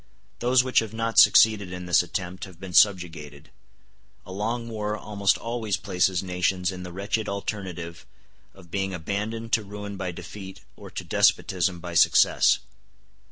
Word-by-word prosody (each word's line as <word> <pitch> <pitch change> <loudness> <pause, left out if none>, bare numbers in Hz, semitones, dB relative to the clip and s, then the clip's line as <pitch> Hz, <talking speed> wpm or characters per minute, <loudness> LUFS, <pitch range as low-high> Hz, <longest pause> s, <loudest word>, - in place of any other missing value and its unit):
Those 125 +1 +3
which 130 -1 +3
have 110 -1 -5
not 115 0 +2
succeeded 105 -4 +6
in 90 0 -6
this 90 - +4
attempt 90 +1 -5
have 90 -3 -15
been 95 -1 -9
subjugated. 80 -8 +1 0.7
A - - -10
long 115 +5 -3
war 105 -2 -3
almost 100 -2 0
always 115 -4 -3
places 90 0 0
nations 90 0 -1
in 90 -1 -8
the 90 -1 -8
wretched 100 +4 -2
alternative 95 -4 -6 0.5
of 90 -4 -17
being 95 -1 -2
abandoned 105 +6 -4
to 110 - +3
ruin 105 0 -8
by 95 -2 -3
defeat 95 +2 -10
or - - -12
to - - -6
despotism 90 -1 +1
by 85 0 -7
success. 85 - +4
95 Hz, 155 wpm, -25 LUFS, 90-105 Hz, 0.7 s, succeeded